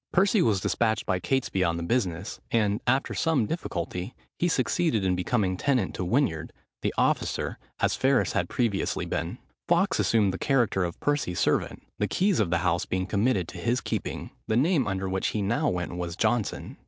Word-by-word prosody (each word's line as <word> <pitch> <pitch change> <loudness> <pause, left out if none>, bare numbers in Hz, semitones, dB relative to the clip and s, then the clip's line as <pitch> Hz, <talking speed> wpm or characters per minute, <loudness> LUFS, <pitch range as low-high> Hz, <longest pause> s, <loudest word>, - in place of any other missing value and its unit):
Percy 200 +2 +4
was 105 - +3
despatched 110 +2 0
by 90 - 0
Catesby 110 -3 0
on 85 -2 +1
the 85 - -3
business, 95 -3 -1
and, 105 -3 +1
after 130 +3 +2
some 160 -8 +2
difficulty, 90 - -4 0.2
he 175 - +2
succeeded 130 - +1
in 90 -1 +2
becoming 95 +1 0
tenant 125 -4 +1
to - - -3
Winyard, 90 - 0 0.3
the - - 0
officer, - - 0 0.2
as - - +2
Ferris 135 -1 +2
had - - -1
previously 115 -6 0
been. - - -3 0.3
Fawkes - - +2
assumed 105 -4 +3
the 95 - -5
character 120 -8 +2
of 85 -1 -4
Percy's 145 -12 0
servant, - - 0 0.2
the 105 - +1
keys 190 - +1
of 105 -6 +2
the 85 - +2
house 85 0 +1
being 95 0 -1
committed 100 -2 +1
to 90 - -8
his 120 +8 +1
keeping. - - -4 0.2
The 110 - +1
name 150 - +3
under 95 -1 -2
which 95 0 -1
he 105 - -1
now 100 - +1
went 90 -1 -3
was 85 -1 -4
Johnson. 110 +1 -1
105 Hz, 185 wpm, -27 LUFS, 90-130 Hz, 0.3 s, Percy